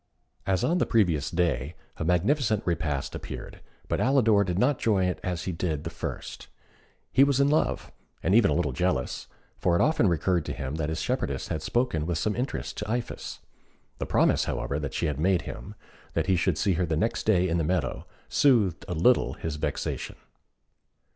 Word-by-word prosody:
As 95 -2 +1
on 175 +2 +2
the - - +1
previous 85 - +2
day, 80 -4 0 0.2
a - - -3
magnificent 105 - +2
repast 75 -5 -1
appeared, - - -7 0.3
but - - -1
Alidor 115 -6 +4
did 90 -3 -2
not 130 +7 +3
enjoy 100 -5 +2
it 90 - -1
as 90 -3 -3
he 95 - -2
did 80 -3 -2
the 85 - -5
first. 80 - -6 0.6
He 135 - +6
was 140 -1 +2
in 140 +1 +4
love, 155 - 0 0.3
and 95 - +2
even 110 -5 +6
a 75 - +1
little 80 -4 +1
jealous; 65 -2 -1 0.3
for 85 - +2
it - - +3
often 155 -7 +3
recurred 85 0 +1
to - - -3
him 65 0 -5
that 80 -1 -1
his 80 0 -2
shepherdess 75 - -2
had 80 - -2
spoken 120 -8 0
with 85 -2 0
some 105 +5 0
interest 125 +3 -3
to 105 - -4
Iphis. 120 +1 -4 0.6
The - - -3
promise, - - +3
however, 70 - -2
that 75 -3 -4
she - - 0
had 75 -2 -2
made 90 +2 +2
him, 100 +2 -8 0.4
that - - +1
he 95 - +3
should 90 -2 +1
see 100 -3 +2
her - - +2
the 80 -1 0
next 110 +6 -1
day 95 -4 +4
in 85 0 0
the - - +1
meadow, 80 -5 -1 0.2
soothed 110 - +3
a 90 - -3
little 120 +10 +3
his 80 -2 -5
vexation. - - -3
90 Hz, 195 wpm, -27 LUFS, 80-110 Hz, 0.6 s, He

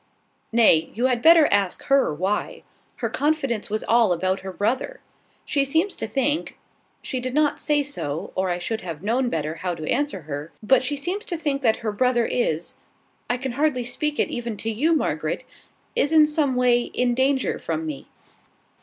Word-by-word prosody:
"Nay: 215 -9 +4
you 240 +3 0
had 250 -2 +1
better 325 0 +7
ask 200 -2 +1
her 275 - +3
why. 185 +7 -2 0.3
Her - - -3
confidence 275 -7 -1
was 215 +1 -2
all 230 -4 +3
about 185 +2 -1
her 190 - -7
brother. 245 - -2 0.5
She 280 - +1
seems 320 +8 0
to - - -4
think, 275 +7 -1 0.5
she 260 - -3
did 255 +1 -4
not 300 -1 +2
say 295 -1 +2
so, 160 - -4
or 185 0 -1
I 175 - 0
should 220 +5 -3
have 165 -3 -7
known 245 +4 +1
better 155 -5 -2
how 180 -2 -3
to 155 -1 -7
answer 290 -10 -1
her, 145 +1 -6
but 260 +4 +4
she 280 +3 -2
seems 360 +9 -3
to 345 - -4
think 290 -3 -1
that 225 -4 +3
her 215 - +1
brother 240 +2 +2
is 175 -11 -1 0.5
(I 245 - +1
can 265 0 -4
hardly 270 -1 0
speak 295 +5 -2
it - - +2
even 235 -3 -4
to 225 - -3
you, 305 +10 +2
Margaret!) 305 - -1 0.5
is 290 - +2
in 310 -1 +7
some 300 -3 +1
way 250 -1 +3
in 245 0 0
danger 265 +2 +1
from 160 -1 -3
me. 150 -3 -6
245 Hz, 190 wpm, -23 LUFS, 195-285 Hz, 0.5 s, better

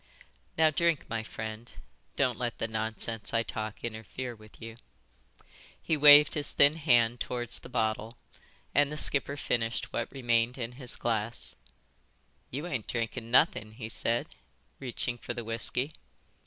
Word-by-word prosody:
"Now 160 -1 +5
drink, 170 -1 +1
my 115 -1 -1
friend. 110 +1 -7 0.4
Don't 125 -4 +1
let 120 -2 -2
the 115 - -1
nonsense 110 0 -3
I 115 - +3
talk 110 -1 -5
interfere 120 +2 -5
with 110 -1 -17
you." 115 0 -9 1.0
He 160 - 0
waved 150 0 +9
his 145 -1 +2
thin 145 +3 +5
hand 120 -6 +3
towards 120 -1 -2
the - - -12
bottle, 110 -1 -1 0.6
and 145 +1 +3
the 150 - -4
skipper 140 -1 0
finished 115 -4 -1
what 115 - -2
remained 120 -2 +1
in 120 -2 -4
his 125 -1 -2
glass. 115 -1 -2 0.9
"You 145 +6 -4
ain't 130 -11 -3
drinking 115 -1 -3
nothin," 115 -4 +3
he 110 -1 -7
said, 115 +1 0 0.5
reaching 120 -2 -3
for - - -5
the 120 - -4
whisky. 115 +5 -1
120 Hz, 145 wpm, -30 LUFS, 115-135 Hz, 1.0 s, waved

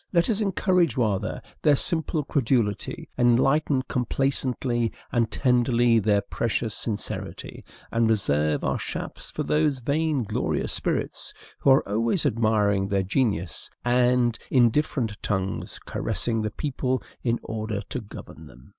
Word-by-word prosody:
Let 170 +4 +3
us 215 0 0
encourage 180 - +2
rather 105 -6 -1 0.2
their 150 -2 +5
simple 160 0 0
credulity, 120 -7 0
enlighten 130 +3 +3
complacently 125 -2 -1 0.2
and 115 -2 +1
tenderly 120 -2 +3
their 105 -1 +2
precious 115 +1 -2
sincerity, 105 -3 -5 0.3
and 115 -1 +2
reserve 75 -8 +1
our - - 0
shafts - - -6
for - - -3
those 150 -2 +1
vain 145 +2 0
glorious 105 - -1
spirits - - -3 0.2
who - - +2
are 135 - +5
always 115 - 0
admiring 105 -3 +2
their 100 -1 +1
genius, 95 - -1 0.2
and, 125 -1 +3
in 120 -3 +5
different 125 -7 -1
tongues, 95 -1 -2
caressing 115 +2 -2
the 105 - -1
people 130 -1 -2 0.2
in 120 -1 0
order 110 -2 -3
to 130 - -3
govern 105 - -11
them. 65 +1 -16
120 Hz, 130 wpm, -25 LUFS, 110-135 Hz, 0.3 s, their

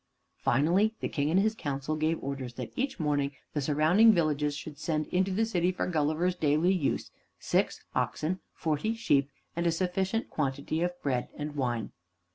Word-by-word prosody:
Finally, 180 - +3
the - - -1
King 145 0 -1
and 175 +4 +4
his 215 +2 +2
council 145 -5 -3
gave 155 +1 +1
orders 135 -3 -4
that - - -6
each 265 -4 -2
morning 145 -2 0 0.2
the 150 - 0
surrounding 155 +10 +5
villages 150 -5 +1
should 150 -1 -8
send 155 -1 -1
into 185 +1 +1
the 210 +4 +1
city 180 -5 +1
for 180 - -2
Gulliver's 160 +2 +1
daily 160 +2 +2
use 165 -7 -1 0.3
six - - 0
oxen, 175 +5 -1
forty 160 +8 -1
sheep, 140 - +2 0.3
and 170 +1 0
a - - +4
sufficient 190 +5 0
quantity 140 +2 -2
of 175 0 -1
bread 125 -3 0
and 150 0 -4
wine. 120 -6 -1
155 Hz, 170 wpm, -29 LUFS, 145-185 Hz, 0.3 s, surrounding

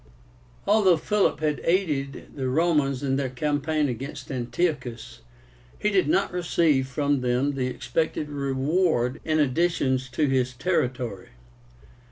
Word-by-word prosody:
Although 200 -5 +4
Philip 200 -2 +1
had 150 -2 0
aided 150 -7 -1
the 130 -2 -2
Romans 145 -3 +1
in 135 -1 +1
their 135 -2 -1
campaign 150 +3 0
against 135 +3 -6
Antiochus, 125 -3 -3 0.6
he 210 - 0
did 190 -6 +2
not 195 +6 +1
receive 165 -6 +2
from 140 +1 0
them 125 +3 +1
the 130 -2 -1
expected 130 +5 -2
reward 140 -1 0
in 155 -1 +1
additions 135 -3 +1
to 150 +4 0
his 130 -2 +1
territory. 125 - -2
140 Hz, 125 wpm, -25 LUFS, 130-160 Hz, 0.6 s, Although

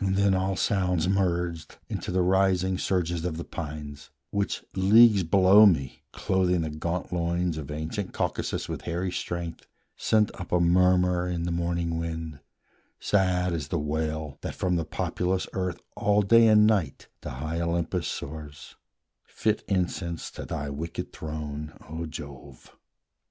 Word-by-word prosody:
Then 95 +1 +2
all 95 +1 0
sounds 90 -4 +1
merged 90 -4 -1
Into - - -5
the 90 0 +2
rising 95 0 +2
surges 85 -3 0
of 85 -3 -2
the 85 - -4
pines, 75 -3 -7 0.2
Which, 100 -1 -1
leagues 105 +2 +6
below 95 +4 +7
me, 70 -9 0
clothing 90 -2 +1
the 80 -1 -3
gaunt 85 +4 -3
loins 85 0 0
Of 75 -3 -6
ancient 80 +7 -4
Caucasus - - -2
with - - -5
hairy 90 +2 -2
strength, 85 -2 -5 0.3
Sent 110 -1 +2
up 90 - -8
a 90 - +3
murmur 90 0 +3
in 85 -1 -2
the 85 - -2
morning 85 -1 -1
wind, 80 -3 -5 0.6
Sad 90 -3 +1
as 75 -4 -3
the 85 - -1
wail 75 -1 -3
that - - -5
from 90 -1 0
the 85 -2 -1
populous 90 +4 -1
earth 90 -2 -2 0.2
All 105 0 +2
day 115 +3 +6
and 105 -1 +6
night 100 -11 0
to - - -6
high 80 +6 -4
Olympus 85 +1 -1
soars, 75 0 -7 0.5
Fit 110 0 -1
incense 90 -3 -2
to - - -7
thy 70 0 -4
wicked 80 +4 -5
throne, 75 -1 -6
O 80 +2 -5
Jove! 70 -4 -10
85 Hz, 150 wpm, -27 LUFS, 80-95 Hz, 0.6 s, below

